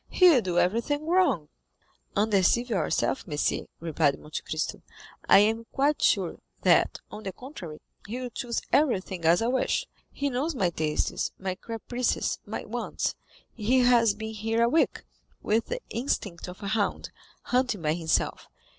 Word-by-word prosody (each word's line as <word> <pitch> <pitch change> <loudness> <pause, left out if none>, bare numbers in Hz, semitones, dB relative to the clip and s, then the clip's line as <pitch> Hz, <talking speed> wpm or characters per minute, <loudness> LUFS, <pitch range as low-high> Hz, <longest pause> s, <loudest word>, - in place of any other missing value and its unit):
—he 365 - +5
will 275 -8 +5
do 180 -4 -2
everything 235 +12 +1
wrong." 320 - +2 0.7
"Undeceive 215 +3 +2
yourself, 205 +4 0
monsieur," 150 -3 -1
replied 155 -4 +1
Monte 150 - -6
Cristo; 155 0 -3 0.5
"I - - +9
am 225 +3 +3
quite 285 +2 +1
sure, - - +2 0.2
that, - - +4
on 210 - -7
the 195 -3 -4
contrary, 185 - -9 0.3
he 235 +5 -4
will 250 -1 -5
choose 235 0 -3
everything 190 - +1
as 170 +6 +4
I - - +1
wish. 260 0 +1 0.3
He 285 0 -2
knows 280 +6 -1
my 185 -8 +1
tastes, 155 -2 -1
my 190 -1 -3
caprices, 230 +5 -2
my - - -5
wants. - - -2 0.4
He 245 +4 +2
has 235 -4 +4
been 220 +1 -6
here 225 +2 0
a 235 - +4
week, 320 +6 +1 0.4
with 225 +2 +1
the - - -4
instinct 210 -8 -2
of 180 +3 -9
a 200 - -2
hound, 205 -1 -1 0.3
hunting 250 -7 0
by 155 0 +2
himself. 165 -1 -1
220 Hz, 155 wpm, -27 LUFS, 180-250 Hz, 0.7 s, I